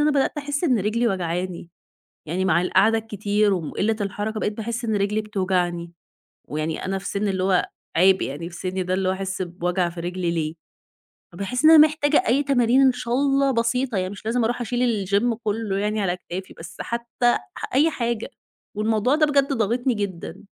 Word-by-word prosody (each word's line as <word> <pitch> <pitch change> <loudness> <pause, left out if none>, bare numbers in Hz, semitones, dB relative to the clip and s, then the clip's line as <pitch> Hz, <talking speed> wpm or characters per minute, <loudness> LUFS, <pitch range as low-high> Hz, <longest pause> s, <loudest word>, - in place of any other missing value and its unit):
أنا 300 +1 +4
بدأت 280 -2 +1
أحس 290 +2 -2
إن 255 -8 +3
رجلِي 220 +4 0
واجعاني، 180 -2 -3 0.6
يعني 180 +4 -1
مع 175 -2 +3
القعدة 225 +4 +3
الكتير 210 -1 0
وقِلَّة 195 +6 -1
الحركة، 205 +2 -3
بقيت 210 0 -2
باحس 235 +2 -4
إن 220 -2 0
رجلِي 205 +2 0
بتوجعني، 180 -4 -1 0.6
ويعني 155 +2 -3
أنا 195 +1 -1
في - - -10
سنّ، 200 +1 -1
اللي 190 -1 -1
هو 185 -2 +2 0.3
عيب 190 +3 +5
يعني 155 +6 -4
في 170 - -10
سِنِّي 185 +2 -3
ده، 180 0 -1
اللي 190 0 0
هو 185 - +2
أحس 190 0 -3
بوجع 180 0 -1
في 170 - -8
رِجلِي 175 0 -2
ليه؟ 160 -2 -2 0.8
فباحس 245 - -2
إن 315 - +9
أنا 320 - +9
محتاجة 305 +2 +1
أي 275 +4 +3
تمارين، 260 -2 +3
إن 265 - +6
شاء 240 -1 -4
الله 275 +1 +2
بسيطة 235 0 0
يعني، 185 0 -1
مش 205 +2 -10
لازِم 235 +2 +1
أرُوح 240 +2 -1
أشيل 240 -3 0
الgym 215 +5 +2
كله 210 -2 -1
يعني 210 +1 -1
على 180 -2 0
كتافي، 180 +1 -7
بس 165 +1 -10
حتى 235 +1 -3 0.3
أح - - -5
أي 300 +5 +5
حاجة. 235 -4 -2 0.5
والموضوع 220 +5 +1
ده 310 - +4
بجد 280 -1 +2
ضاغطني 240 +2 +1
جدًا. 195 -2 -5
210 Hz, 190 wpm, -23 LUFS, 185-240 Hz, 0.8 s, إن